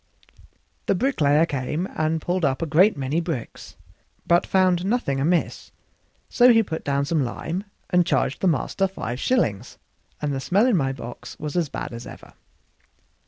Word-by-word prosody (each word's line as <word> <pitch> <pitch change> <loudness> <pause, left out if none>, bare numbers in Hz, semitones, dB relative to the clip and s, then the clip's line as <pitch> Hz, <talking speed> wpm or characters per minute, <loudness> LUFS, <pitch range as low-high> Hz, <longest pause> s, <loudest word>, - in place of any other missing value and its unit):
The - - +3
bricklayer 160 - +2
came 150 +4 -3
and 155 +1 0
pulled 180 0 -1
up 140 +2 +1
a - - 0
great 175 +6 +4
many 140 +5 -1
bricks, 160 -9 -6 0.5
but 170 0 +3
found 185 -2 +2
nothing 195 - 0
amiss; 165 +5 0 0.6
so 245 0 +5
he 225 -1 +5
put 160 -5 -5
down 140 0 0
some 155 -1 +1
lime 170 - -4 0.3
and 180 -1 +4
charged 175 - 0
the 190 - +2
master 180 +4 +1
five 130 -10 -5
shillings, 120 - 0 0.4
and 150 -1 -2
the 135 - -2
smell 190 - +2
in 250 -4 +3
my 135 -6 +1
box 120 -2 -9
was 150 +1 -5
as 170 -5 0
bad - - -6
as 115 +1 -8
ever. - - -12
165 Hz, 165 wpm, -23 LUFS, 140-185 Hz, 0.6 s, so